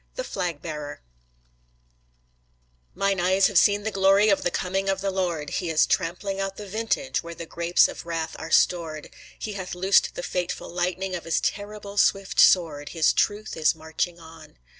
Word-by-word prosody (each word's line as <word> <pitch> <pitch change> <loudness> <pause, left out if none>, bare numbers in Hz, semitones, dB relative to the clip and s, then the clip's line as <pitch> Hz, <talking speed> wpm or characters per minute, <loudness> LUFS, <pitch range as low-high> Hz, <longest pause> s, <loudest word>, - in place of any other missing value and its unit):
THE - - -3
FLAG 175 - -4
BEARER 150 - -6 1.9
Mine 195 -1 0
eyes 185 +2 +3
have 200 -4 +5
seen 205 0 +3
the 220 - -2
glory 195 +2 +4
of 195 - +3
the - - 0
coming 190 +2 -2
of 195 0 0
the 195 0 -1
Lord; 175 -6 -2
He 175 - -2
is 160 -1 +4
trampling 195 +3 -2
out 195 0 -3
the 210 - -7
vintage 225 +6 -2
where 170 0 -9
the 170 +1 -7
grapes 170 +1 +3
of - - -8
wrath 165 -1 -3
are 160 - -6
stored; 160 -4 +1 0.3
He 215 - -5
hath 185 -2 -6
loosed 190 +2 +3
the - - -5
fateful 180 -1 -3
lightning 180 +2 -2
of 175 - -5
His 165 - +1
terrible 205 0 -4
swift 195 -1 +2
sword; 155 -5 +4
His 160 -2 +2
truth 210 +1 -1
is 160 0 +2
marching 160 +2 -3
on. 160 -1 -14
180 Hz, 180 wpm, -25 LUFS, 165-195 Hz, 1.9 s, have